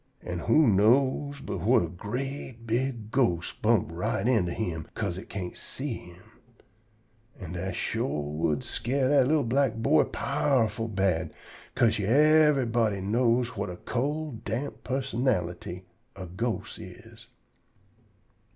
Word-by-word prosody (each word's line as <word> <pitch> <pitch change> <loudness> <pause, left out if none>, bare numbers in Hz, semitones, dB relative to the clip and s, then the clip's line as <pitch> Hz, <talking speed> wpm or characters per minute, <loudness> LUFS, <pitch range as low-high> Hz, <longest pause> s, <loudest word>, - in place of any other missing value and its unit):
An' 90 0 -4
who 155 - +4
know 130 +7 +3
but - - -3
whut 105 +4 +4
a - - -2
great, 120 - -5
big 115 -1 -2
ghost 90 -11 0
bump 110 -5 +3
right 90 +5 -1
into 110 -9 +2
him 85 -7 -3
'ca'se 90 +2 -2
it - - -12
can't 90 -3 -5
see 135 -1 -4
him? 90 +2 -14 1.2
An' 90 -5 -7
dat 90 +1 -4
shore 115 - -1
w'u'd 75 -1 0
scare 130 +2 0
dat 140 -3 +4
li'l 155 0 +3
black 130 0 +1
boy 115 0 +3
powerful 115 -5 0
bad, 95 -6 0 0.4
'ca'se 115 -3 +3
yever'body 125 -3 +4
knows 115 +4 +2
whut 125 - -4
a 90 - -7
cold, 145 +2 -3
damp 130 +6 -4
pussonality 100 -9 -2 0.3
a 95 -1 -7
ghost 110 +7 -4
is. - - -12
115 Hz, 130 wpm, -28 LUFS, 95-130 Hz, 1.2 s, who